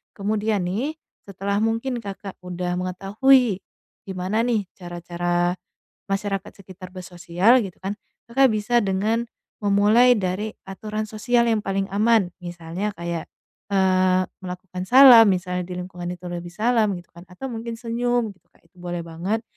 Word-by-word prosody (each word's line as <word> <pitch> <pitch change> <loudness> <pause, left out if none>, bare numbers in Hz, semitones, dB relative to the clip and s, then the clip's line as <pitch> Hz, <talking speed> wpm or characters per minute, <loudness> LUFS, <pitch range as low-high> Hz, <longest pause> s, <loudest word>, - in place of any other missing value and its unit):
Kemudian 210 0 0
nih 245 - -2 0.3
setelah 200 +1 -2
mungkin 230 +3 -1
Kakak 195 -1 -7
udah 180 0 -3
mengetahui 195 +5 +2 0.5
gimana 190 +4 -1
nih 225 -5 0
cara-cara 175 0 -2 0.5
masyarakat 195 0 -2
sekitar 185 0 -11
bersosial 180 +5 +2
gitu 195 -6 -5
kan, 200 +2 -4 0.3
Kakak 270 +2 +5
bisa 215 +3 +2
dengan 215 +3 0 0.3
memulai 210 +5 +5
dari 205 +2 -2
aturan 210 +3 -5
sosial 235 +3 +1
yang 220 - +2
paling 195 -1 -1
aman, 210 -2 +3
misalnya 175 +3 -5
kayak, 170 -1 -4 0.4
eee, 185 -1 +3 0.2
melakukan 180 0 -6
salam 250 -3 +9
misalnya 180 -2 -1
di 180 - -6
lingkungan 180 -1 -6
itu 180 - -23
lebih 175 0 -5
salam 220 -1 +2
gitu 175 -1 -11
kan, 175 +1 -14
atau 245 +10 -7
mungkin 230 0 -5
senyum 235 -1 -1
gitu 190 - -23
Kak - - -29
itu 180 - -30
boleh 175 -1 -4
banget. 180 +7 -3
195 Hz, 140 wpm, -23 LUFS, 180-225 Hz, 0.5 s, salam